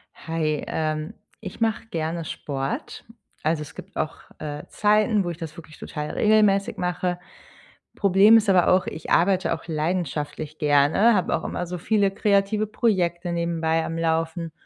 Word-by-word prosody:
Hi, 155 -2 -2
ähm, 155 -1 -2 0.3
ich - - -8
mache 225 0 0
gerne 165 -3 -3
Sport. 135 -3 -5 0.4
Also, 155 0 +1
es 150 +1 -9
gibt - - -11
auch, 155 - -2 0.2
äh, 150 -1 -5
Zeiten, 210 0 +2
wo 175 - -3
ich 170 - -5
das 160 -3 -7
wirklich 155 -2 -12
total 150 0 -5
regelmäßig 210 -2 +3
mache. 180 0 -2 0.8
Problem 200 +3 +6
ist 215 -2 +1
aber 185 -3 +4
auch, 185 0 +4
ich 155 - -7
arbeite 185 0 +3
auch 165 - -6
leidenschaftlich 155 -2 -3
gerne, 150 +10 +4
habe 185 -4 +1
auch 160 - -4
immer 175 - -3
so 180 +1 -4
viele 200 +2 +1
kreative 200 +1 +1
Projekte 180 -6 0
nebenbei 165 -1 0
am 165 - -4
Laufen 165 0 -1
170 Hz, 155 wpm, -24 LUFS, 155-195 Hz, 0.8 s, Problem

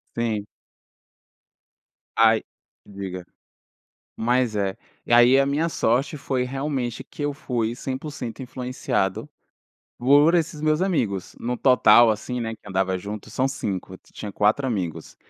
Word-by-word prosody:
Sim. 110 -3 -1 1.7
Aí 115 -1 +5 0.4
diga. 95 -3 -7 0.9
Mas 120 0 +1
é. 95 -1 -1 0.3
E - - -2
aí 120 +3 +7
a 135 - +3
minha 150 +4 +1
sorte 135 0 0
foi 135 -2 -1
realmente 130 -2 -3
que 145 - -9
eu 145 - 0
fui 120 -6 -2
100% 130 -3 -5
influenciado 125 -5 -2 0.7
por 145 +7 +5
esses 165 -2 0
meus 155 +2 +2
amigos, 110 - -1
no 125 +1 -2
total 120 -2 +6
assim, 120 +3 -4
né, 115 -1 -3
que 110 - -15
andava 95 -1 0
junto 100 +3 -7
são 130 - 0
5, 95 -8 -4
ti - - -26
tinha 105 - -7
4 110 +8 +2
amigos 85 -8 -4
120 Hz, 135 wpm, -24 LUFS, 105-135 Hz, 1.7 s, aí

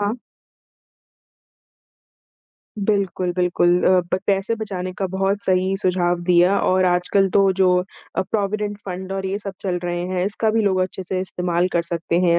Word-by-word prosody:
हाँ। 205 +2 0 2.7
बिल्कुल, 195 -3 0
बिल्कुल। 175 -1 +2
अ, - - +5
ब 180 +1 -2
पैसे 195 +3 +1
बचाने 185 -3 -4
का 195 - 0
बहुत 195 +2 -1
सही 185 +1 +1
सुझाव 175 -1 +1
दिया 180 +3 +5
और 185 0 +2
आजकल 180 +2 +2
तो 195 -1 +5
जो 180 -1 +5 0.4
अ, - - +2
प्रॉविडेंट 205 0 -2
फ़ंड 190 0 -5
और 195 0 -3
ये 195 +1 -2
सब 200 -2 -6
चल 180 -2 -2
रहे 175 0 -2
हैं, 185 0 -1
इसका 215 +2 0
भी 225 0 +1
लोग 190 -2 +2
अच्छे 185 +1 -2
से 185 +1 -2
इस्तेमाल 180 -1 -1
कर 170 - +2
सकते 170 0 -1
हैं 170 -1 +3
185 Hz, 165 wpm, -21 LUFS, 180-195 Hz, 2.7 s, अ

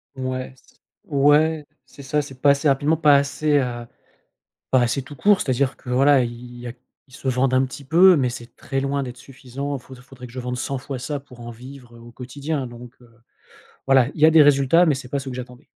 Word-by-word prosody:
Ouais 130 0 -5
s - - -27 0.3
ouais 150 0 +2 0.2
c'est 140 - -14
ça. 150 +2 0
C'est 135 -3 -12
pas 145 - +5
assez 140 +2 +1
rapidement 145 +3 +2
pas 150 -3 +5
assez, 145 +1 +1
heu, 120 -2 -4 0.9
pas 130 - +4
assez 120 +3 -1
tout 145 +2 -12
court. 205 +6 +3
C'est 130 - -2
à - - +3
dire 135 +1 -1
que, 125 - -10
voilà, 135 +1 +4
ils 120 +1 -7
y 120 - -9
a 120 - -5 0.4
ils 130 - -19
se - - -11
vendent 130 0 +1
un 130 +1 +3
petit 135 +2 -10
peu 175 +6 +6
mais 130 -5 +1
c'est 120 0 -10
très 135 - -5
loin 140 +1 -1
d'être 125 -1 -7
suffisant 140 +2 -7
fau 130 +1 -14
faudrait 125 0 -13
que - - -16
je 130 - -8
vende 125 0 -4
100 135 +1 -3
fois 130 -1 -7
ça 145 +3 -4
pour 125 -3 -16
en 120 0 -8
vivre, 125 0 -13
heu, - - -14
au 120 0 -14
quotidien 135 +2 -5
donc 120 0 -12
heu, 120 -1 -20 0.8
voilà, 130 -2 +4
il - - -7
y 155 - +7
a - - +6
des 160 -2 +7
résultats 145 +4 +4
mais 145 -4 +2
c'est 125 -2 -9
pas 140 +1 -2
ceux 135 -1 -7
que 125 - -7
j'attendais. 125 +1 -10
135 Hz, 245 wpm, -22 LUFS, 125-145 Hz, 0.9 s, y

